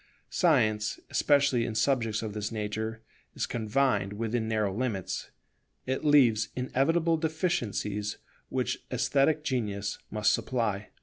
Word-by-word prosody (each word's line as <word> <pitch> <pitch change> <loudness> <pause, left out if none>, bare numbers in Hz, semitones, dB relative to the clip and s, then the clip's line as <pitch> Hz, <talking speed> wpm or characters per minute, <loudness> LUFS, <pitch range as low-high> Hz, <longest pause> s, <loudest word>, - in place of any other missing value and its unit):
Science, 110 - +2
especially 140 -4 +3
in 115 - -3
subjects 115 -4 +1
of 110 -2 -4
this 105 +1 -3
nature, 110 +1 -3 0.3
is - - -1
confined 115 -2 0
within 115 +1 -2
narrow 110 -3 0
limits; 110 -6 -2 0.6
it 130 +3 -2
leaves 135 -8 +4
inevitable 160 +6 +1
deficiencies 120 - -1 0.3
which - - -2
esthetic 150 +2 +2
genius 105 -8 -2
must 105 -1 +2
supply. 105 -5 -1
115 Hz, 115 wpm, -29 LUFS, 105-140 Hz, 0.6 s, leaves